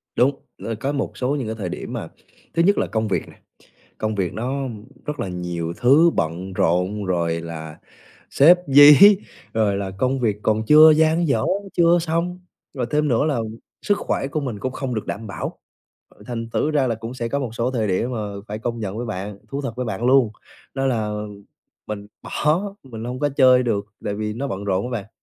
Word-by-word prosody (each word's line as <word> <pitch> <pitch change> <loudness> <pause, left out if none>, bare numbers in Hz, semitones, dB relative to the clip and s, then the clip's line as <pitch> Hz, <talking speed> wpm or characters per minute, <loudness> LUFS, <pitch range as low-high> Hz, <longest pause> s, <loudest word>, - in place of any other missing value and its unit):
Đúng, 135 +3 +3 0.3
ơ, 115 - -3
có 135 +4 -1
một 140 -2 -3
số 130 +3 0
những 135 -6 -3
cái 110 - -3
thời 100 -5 -4
điểm - - -6
mà - - -4 0.5
thứ 170 - +2
nhất 200 +3 +3
là - - +1
công 110 -1 -1
việc 100 - -1
nè, - - -16 0.6
công 110 0 -1
việc 95 -4 -1
nó 130 +5 -2 0.4
rất 150 0 -4
là - - -2
nhiều 90 -2 -4
thứ 145 +7 +5
bận 85 +4 -2
rộn 90 +4 0
rồi 85 -3 0
là 80 -2 -8 0.5
sếp 170 +6 +6
dí, 145 +1 +9 0.6
rồi 105 -3 +1
là 100 -1 -3
công 130 +4 0
việc 110 -4 +1
còn 110 0 +1
chưa 155 +3 +9
dang 160 +2 +3
dở, 115 -6 +1 0.3
chưa 170 0 +4
xong, 170 +2 -1 0.4
rồi 125 -4 -2
thêm 150 0 +1
nữa 125 +1 +2
là 150 -5 0 0.4
sức 205 0 +1
khỏe - - -2
của 155 +2 -2
mình 125 -7 -4
cũng 130 +5 -3
không 130 -2 -4
được 110 - -4
đảm 110 +2 -5
bảo, 100 - -6 0.7
thành 115 -1 -5
thử 155 - +1
ra 145 -4 +2
là 115 - 0
cũng 115 +2 -7
sẽ 120 -2 -3
có 140 +4 -1
một 130 -5 -3
số 120 +2 0
thời 115 -4 -1
điểm 100 +6 0
mà 120 - -3 0.3
phải 105 +1 -5
công 120 +1 -3
nhận 105 -1 -4
với 120 - -3
bạn, 105 -2 -5
thú 140 +1 -3
thật 135 -4 -4
với 125 0 -3
bạn 110 +1 -3
luôn, 130 -3 +4 0.4
đó 135 0 -1
là 110 -5 0 0.8
mình 105 -1 -6
bỏ, 155 +4 0 0.2
mình 115 -4 -8
hông 125 +1 -5
có 145 - +1
chơi 130 -2 +6
được 105 -4 -1 0.2
tại 100 - -1
vì 105 0 -3
nó 135 +5 -3
bận 100 -5 -4
rộn 100 +1 0
á 125 - -5
bạn. 100 - -17
120 Hz, 215 wpm, -22 LUFS, 105-140 Hz, 0.8 s, dí